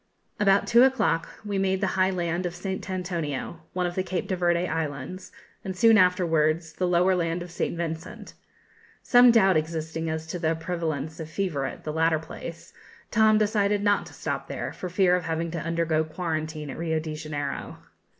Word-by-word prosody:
About 200 -1 +4
two 235 +1 +5
o'clock 260 -10 +3 0.2
we 200 -1 -1
made 190 0 +1
the 205 - +1
high 185 0 +3
land 175 -1 -1
of 175 - -7
St. 190 +1 -5
Antonio, 170 -4 -3
one 180 -1 0
of 175 - -2
the 185 - 0
Cape 185 -1 -3
de 190 - -1
Verde 175 0 +1
Islands, 160 +3 -4 0.3
and, 190 -1 -5
soon 225 +2 +6
afterwards, 165 -4 +2
the 180 - -1
lower 180 +2 +3
land 170 0 -1
of 175 - -11
St 170 - -2
Vincent. 165 -1 -5 0.7
Some 245 0 +7
doubt 195 -7 +5
existing 160 +1 -3
as 160 0 -3
to 175 +2 -5
the 165 -1 +1
prevalence 160 -2 -3
of 160 -1 -6
fever 155 -6 -2
at - - -6
the 155 - -4
latter 160 0 +3
place, 165 +1 -9 0.4
Tom 220 0 +5
decided 205 -1 +1
not 205 0 +2
to - - -13
stop - - -4
there, - - -4
for 180 - -6
fear 180 0 +3
of 180 - -2
having 165 0 -2
to 170 - -3
undergo 165 -1 0
quarantine 155 -2 -4
at - - -8
Rio 160 -1 0
de 155 0 -5
Janeiro. 150 -2 -5
170 Hz, 190 wpm, -26 LUFS, 160-185 Hz, 0.7 s, Some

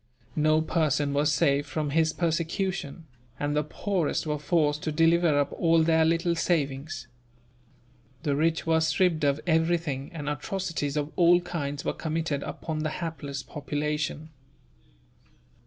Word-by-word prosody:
No 155 +1 +3
person 150 -3 +1
was 145 +2 +2
safe 140 -1 +2
from 150 -2 -2
his 160 +1 +3
persecution, 170 -1 -2 0.3
and 145 0 -1
the 150 - +2
poorest 175 +2 -1
were 150 -1 -2
forced 150 -1 +1
to 155 - -2
deliver 165 0 +3
up 145 0 0
all 165 -1 +3
their 160 0 +4
little 165 +1 +2
savings. 140 -6 -1 1.2
The 145 -4 +1
rich 160 +2 +1
were 160 -1 +3
stripped 165 -1 +2
of 140 0 +2
everything, 160 -4 0
and 150 -4 -6
atrocities 155 -2 -2
of 150 +1 -2
all 175 0 +6
kinds 145 -5 -4
were - - 0
committed 160 -3 -2
upon 155 +1 -4
the 155 0 -1
hapless 145 -4 -5
population. 150 +1 -3
155 Hz, 140 wpm, -27 LUFS, 145-165 Hz, 1.2 s, all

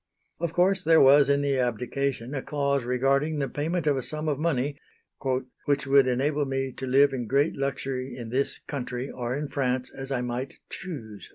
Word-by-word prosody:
Of 170 -1 -1
course 185 +2 +3
there 160 0 +6
was 140 +1 +7
in 140 0 +3
the 140 -2 +1
abdication 125 +2 -1
a 135 - -2
clause 140 -3 0
regarding 135 +5 +1
the 140 -2 0
payment 160 +4 -2
of 145 -2 +2
a - - -1
sum 155 +4 -3
of 145 -2 0
money 145 -3 0 0.9
"which 145 -1 +1
would 135 -1 +5
enable 145 +4 +1
me 135 0 -2
to 130 - -4
live 135 +2 +5
in 120 -3 -3
great 140 +6 +2
luxury 135 -1 -3
in 120 -2 -6
this 135 +4 0
country 125 -1 -5
or 125 0 -3
in 145 +1 -3
France 130 -2 -1
as 135 0 -6
I 130 -2 0
might 125 +2 -4 0.2
choose." 115 - -7
135 Hz, 190 wpm, -27 LUFS, 130-145 Hz, 0.9 s, was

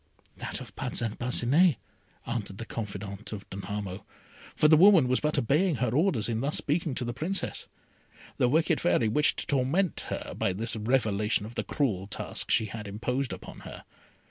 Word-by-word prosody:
"That - - -4
of - - -11
Parcin 115 -3 -2
Parcinet," 130 +7 +3 0.5
answered 110 -5 -4
the 115 - -6
confidante 100 -1 -6
of 100 - -10
Danamo, 100 -1 -5 0.5
for 150 - +5
the 155 - +7
woman 175 -4 +7
was 130 0 +2
but 150 0 0
obeying 150 +7 +2
her 125 -3 0
orders 140 - +2
in 115 -1 -1
thus 145 +3 0
speaking 150 -2 -1
to 125 - -2
the 120 - -3
Princess. 165 +10 -2 0.7
The 125 - +3
wicked 160 +5 +2
Fairy 145 -9 +3
wished 150 +7 +2
to - - -3
torment 145 +7 +1
her - - -4
by 95 - 0
this 110 +4 -2
revelation 105 -3 +1
of 115 - -8
the - - -2
cruel 100 -10 -1
task 100 - -4
she 110 - +3
had 105 +1 -7
imposed 125 +6 -2
upon - - -8
her. - - -10
120 Hz, 175 wpm, -28 LUFS, 105-150 Hz, 0.7 s, the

